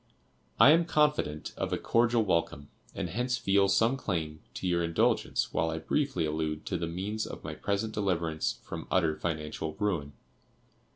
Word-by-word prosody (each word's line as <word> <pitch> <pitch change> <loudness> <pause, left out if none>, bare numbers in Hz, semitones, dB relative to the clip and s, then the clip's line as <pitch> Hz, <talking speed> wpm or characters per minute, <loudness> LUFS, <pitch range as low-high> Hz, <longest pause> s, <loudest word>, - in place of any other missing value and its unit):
I 145 - +9
am 165 +2 +5
confident 150 - +1
of - - -2
a - - +1
cordial 115 0 +2
welcome, 85 -6 -1 0.3
and - - -2
hence 125 +4 -1
feel 100 0 +3
some 115 +6 +3
claim 80 -9 -3 0.2
to 95 - -3
your 85 -1 +1
indulgence 85 0 +1
while 80 - +1
I 80 - -3
briefly 110 - 0
allude 75 0 -2
to 90 - -1
the 85 - -2
means 100 +6 -3
of - - -8
my - - -5
present 100 +2 -2
deliverance 85 -6 -1
from - - -7
utter 80 -4 +2
financial 80 -1 -4
ruin. 85 -9 -1
90 Hz, 165 wpm, -30 LUFS, 80-110 Hz, 0.3 s, I